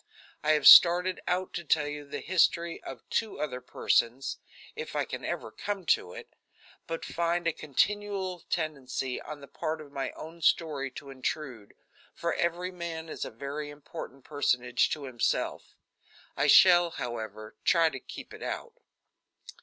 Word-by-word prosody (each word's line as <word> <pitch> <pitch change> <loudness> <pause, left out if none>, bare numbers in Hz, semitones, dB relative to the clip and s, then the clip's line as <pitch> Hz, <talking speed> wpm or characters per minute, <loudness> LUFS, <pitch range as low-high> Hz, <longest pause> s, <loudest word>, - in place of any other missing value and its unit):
I 155 +1 +4
have 150 - +1
started 180 +1 +8
out 180 +1 -1
to 170 - -4
tell 155 -1 +2
you 145 0 -6
the - - -5
history 170 -1 +2
of 125 -4 -9
two 225 -2 -1
other 130 -4 -3
persons 125 +1 0 0.4
if 460 +1 -6
I - - +1
can - - -6
ever - - -4
come 200 -3 -4
to 90 - -5
it - - -11 0.5
but 165 0 -4
find 170 +1 -1
a 165 - +2
continual 190 +5 -1
tendency 135 -5 -2
on 150 -1 -8
the 140 - -11
part 155 +3 -3
of 150 -2 -11
my 135 -1 -3
own 165 +2 -10
story 150 -5 +1
to 140 +2 -10
intrude, 130 -4 -5 0.4
for - - -1
every 175 +2 -1
man 165 -2 -6
is - - -4
a - - -5
very 140 +5 -5
important 140 -2 -9
personage 125 -4 +1
to 150 - -3
himself. 125 -4 -2 0.6
I - - +1
shall, 175 -2 +7
however, 110 -6 -6
try 165 -2 +4
to - - -6
keep - - -10
it - - -11
out. 470 - -5
155 Hz, 160 wpm, -29 LUFS, 135-175 Hz, 0.6 s, started